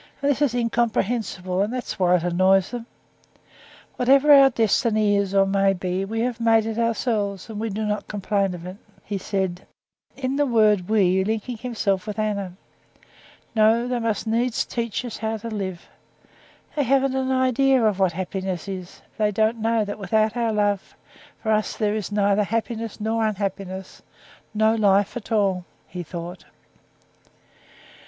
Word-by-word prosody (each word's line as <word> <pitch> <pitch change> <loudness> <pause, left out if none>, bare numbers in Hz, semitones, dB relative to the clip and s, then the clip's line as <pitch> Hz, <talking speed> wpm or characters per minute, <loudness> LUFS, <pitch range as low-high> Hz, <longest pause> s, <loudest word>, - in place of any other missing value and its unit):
And 280 0 +2
this 280 - -2
is 270 -5 +2
incomprehensible, 225 -5 -1
and 205 +3 0
that's 250 -4 -5
why 180 -1 +4
it 170 - 0
annoys 185 +2 +3
them. 240 -1 -6 1.1
Whatever 275 +4 +5
our 275 -1 +8
destiny 215 -3 +2
is 200 -1 0
or 195 0 +5
may 195 0 +2
be, 185 +1 -2
we 225 +3 -3
have 245 -1 -2
made 225 -1 +3
it 225 0 -3
ourselves, 225 -4 -1
and 210 - -6
we 225 +1 -2
do 215 +2 -3
not 210 0 -2
complain 200 -2 -1
of 170 0 -10
it," 185 +2 -8 0.3
he 200 -2 -4
said, 190 -2 -3 0.5
in 270 0 -2
the 290 - +3
word 215 -6 +3
we 190 -3 +3
linking 220 +4 -2
himself 215 -5 -2
with 210 0 -5
Anna. 200 -4 -2 1.0
"No, 225 +2 +4
they 250 -1 -1
must 225 -2 -1
needs 230 +2 0
teach 235 +1 -3
us 235 - -6
how 220 0 -2
to 230 +2 -7
live. 190 -4 -5 0.9
They 295 - +1
haven't 270 0 +2
an 265 0 0
idea 260 -1 +3
of 205 -3 +1
what 190 -3 +2
happiness 185 0 -4
is; 185 -2 -7 0.2
they 210 -1 +3
don't 220 +3 +1
know 225 -1 +1
that 205 +1 -6
without 215 +2 +1
our 235 -2 0
love, 205 -2 -1 0.5
for 220 - 0
us 215 0 0
there 210 -2 +1
is 215 -2 -3
neither 205 0 +2
happiness 225 +1 -3
nor 220 +1 0
unhappiness—no 200 +2 -3
life 205 -2 +2
at 235 -1 -7
all," 195 -4 +1 0.2
he 180 - -6
thought. 175 +1 -8
215 Hz, 160 wpm, -23 LUFS, 195-230 Hz, 1.1 s, our